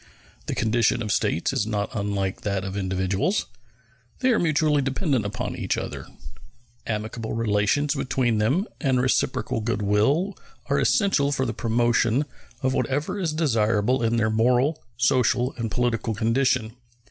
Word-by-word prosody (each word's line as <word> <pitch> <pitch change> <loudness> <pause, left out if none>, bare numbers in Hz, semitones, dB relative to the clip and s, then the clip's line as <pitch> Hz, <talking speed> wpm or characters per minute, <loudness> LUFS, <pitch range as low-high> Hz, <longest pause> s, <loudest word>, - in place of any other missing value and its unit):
The - - -2
condition 115 +1 +1
of 105 - -3
States 85 - 0
is 105 - 0
not 105 -1 -2
unlike 100 -3 -2
that 100 -2 -2
of 95 0 -5
individuals; 95 - 0 0.8
they 260 0 +3
are 230 - +3
mutually 155 -3 +2
dependent 135 - 0
upon 100 - -4
each - - -2
other. - - -5 0.8
Amicable 110 +1 -3
relations 115 +6 +1
between 125 -5 0
them 135 - +2
and 135 -5 +1
reciprocal 125 -2 0
good 110 -1 -1
will 135 - +2 0.3
are - - +1
essential 175 - +2
for 130 -2 0
the 115 - -2
promotion 120 +3 +1 0.4
of 130 0 +1
whatever 145 +11 -1
is 170 -5 0
desirable 115 -5 +1
in 115 0 +1
their 110 -1 +1
moral, 125 +7 +2 0.2
social, 125 0 +2
and 115 -2 -3
political 115 -1 -1
condition. 115 +1 +1
120 Hz, 145 wpm, -24 LUFS, 105-135 Hz, 0.8 s, they